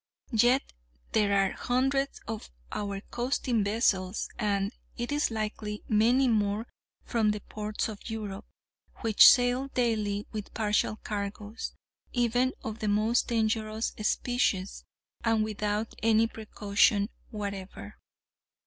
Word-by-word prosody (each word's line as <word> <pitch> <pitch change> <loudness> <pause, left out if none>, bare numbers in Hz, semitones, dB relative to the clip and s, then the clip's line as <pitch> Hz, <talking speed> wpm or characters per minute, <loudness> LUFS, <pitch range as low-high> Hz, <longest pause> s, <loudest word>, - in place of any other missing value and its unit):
Yet 240 +4 +4 0.5
there 210 -2 +2
are 195 -1 +3
hundreds 270 +2 0
of 225 -2 -5 0.2
our 200 -1 -3
coasting 240 -2 0
vessels, 200 -2 +1
and, 200 -1 0 0.3
it 240 +2 -3
is 295 +1 +1
likely, 215 -1 -4
many 235 +5 +4
more 210 -1 +1 0.4
from 225 -3 +1
the 210 0 0
ports 210 +1 -3
of 215 +1 -8
Europe, 210 -2 -5 0.5
which 225 -3 +8
sail 250 +1 +3
daily 215 -5 0
with 215 -2 -6
partial 215 -1 +1
cargoes, 210 +2 -5 0.4
even 245 +1 +2
of 220 0 -5
the 215 - -2
most 215 +4 +2
dangerous 220 -1 0
species, 215 -4 0 0.4
and 225 -1 +3
without 210 0 -2
any 225 0 +4
precaution 210 -2 +1 0.2
whatever. 200 -3 -6
215 Hz, 115 wpm, -29 LUFS, 205-235 Hz, 0.5 s, which